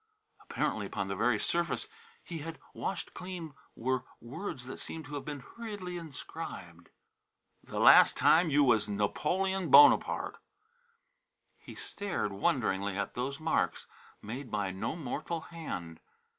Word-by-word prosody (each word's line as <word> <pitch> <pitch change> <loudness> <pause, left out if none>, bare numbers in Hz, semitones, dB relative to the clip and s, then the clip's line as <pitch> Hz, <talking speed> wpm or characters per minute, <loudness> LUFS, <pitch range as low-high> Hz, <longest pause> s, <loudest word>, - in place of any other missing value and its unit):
Apparently 105 -2 -2
upon 95 - -3
the 100 - -2
very 115 +3 +2
surface 170 - -1 0.4
he 170 -2 -6
had 160 +2 -6 0.2
washed 195 - -4
clean 180 -5 -7 0.2
were 130 +1 -1 0.2
words 125 - -6
that 130 - -7
seemed 160 -1 -6
to 145 - -10
have 145 - -4
been 145 -2 -5
hurriedly 205 - -7
inscribed: 130 - -8 0.7
"The - - -7
last - - +8
time 165 +1 +5
you 145 0 +4
was 110 -5 +3
Napolen 175 - 0
Bonopart." 140 +2 +6 1.2
He - - -11
stared 205 - -3
wonderingly 100 -2 0
at 100 - -2
those 135 +3 -3
marks 160 +1 0 0.4
made 125 +5 -6
by 100 -3 -1
no 95 +11 -3
mortal 165 +2 -4
hand. 90 - -7
140 Hz, 130 wpm, -31 LUFS, 105-170 Hz, 1.2 s, last